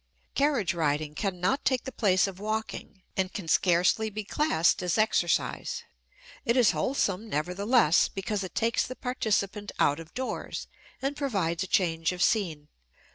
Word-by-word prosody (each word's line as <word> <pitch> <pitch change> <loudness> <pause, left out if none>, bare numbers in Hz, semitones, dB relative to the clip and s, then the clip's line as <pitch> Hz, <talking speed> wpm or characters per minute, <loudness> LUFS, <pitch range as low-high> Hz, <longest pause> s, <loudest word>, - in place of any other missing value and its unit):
Carriage 275 -10 +1
riding 150 -2 0
cannot 195 - -1
take 260 -3 +1
the 265 - -6
place 195 -6 +3
of 195 -2 -6
walking 215 -2 -4
and 190 -1 0
can 195 -6 -6
scarcely 180 +6 +3
be 215 +1 -5
classed 205 - +2
as 180 -2 0
exercise; 215 -5 +1 0.6
it 235 +2 +1
is 245 -4 +6
wholesome, 220 -5 -1
nevertheless, 180 - +3
because 195 +1 -3
it 185 - -8
takes 230 +1 +1
the 255 - -6
participant 210 -5 -1
out 145 +2 +2
of 165 0 -10
doors 260 0 -4 0.4
and 275 +1 -1
provides 195 - -1
a 190 - -2
change 165 -2 +1
of 180 - 0
scene. 165 -9 0
195 Hz, 150 wpm, -28 LUFS, 175-225 Hz, 0.6 s, is